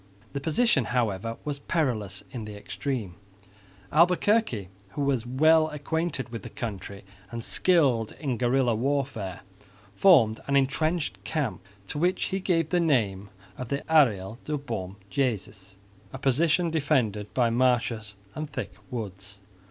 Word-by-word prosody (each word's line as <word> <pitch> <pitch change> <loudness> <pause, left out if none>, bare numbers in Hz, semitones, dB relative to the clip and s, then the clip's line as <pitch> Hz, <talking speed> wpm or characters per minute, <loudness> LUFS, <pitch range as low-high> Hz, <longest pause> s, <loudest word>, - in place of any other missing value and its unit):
The 140 - -2
position, 160 - +2
however, 115 -2 -1
was 145 -2 -3
perilous 115 - -1
in 115 -4 -5
the 105 -1 -8
extreme. 105 -4 -4 0.7
Albuquerque, 175 - +3 0.2
who 145 - -2
was 130 -4 0
well 155 +5 +5
acquainted 150 -2 -2
with 115 -2 -6
the - - -8
country 100 -3 -6 0.3
and 115 -1 -5
skilled 135 -13 +2
in 135 -5 -2
guerrilla 125 0 +2
warfare, 125 -6 -2 0.5
formed 125 - +5
an 140 - +1
entrenched 155 +4 +1
camp 145 -11 -2 0.3
to 145 - -3
which 180 +3 +1
he 190 - +1
gave 165 -4 +1
the 180 - +2
name 105 - +1 0.3
of 125 - -4
the 140 0 -2
Arreyal 115 -9 +3
de 150 0 -1
Bom 110 -9 -5 0.2
Jesus, 100 -7 -2 0.3
a - - -6
position 155 +5 +2
defended 125 -10 0
by 120 -3 +3
marshes 115 -4 +1 0.2
and 155 -1 -5
thick 135 -2 -5 0.2
woods. 100 -5 -5
130 Hz, 135 wpm, -27 LUFS, 110-150 Hz, 0.7 s, well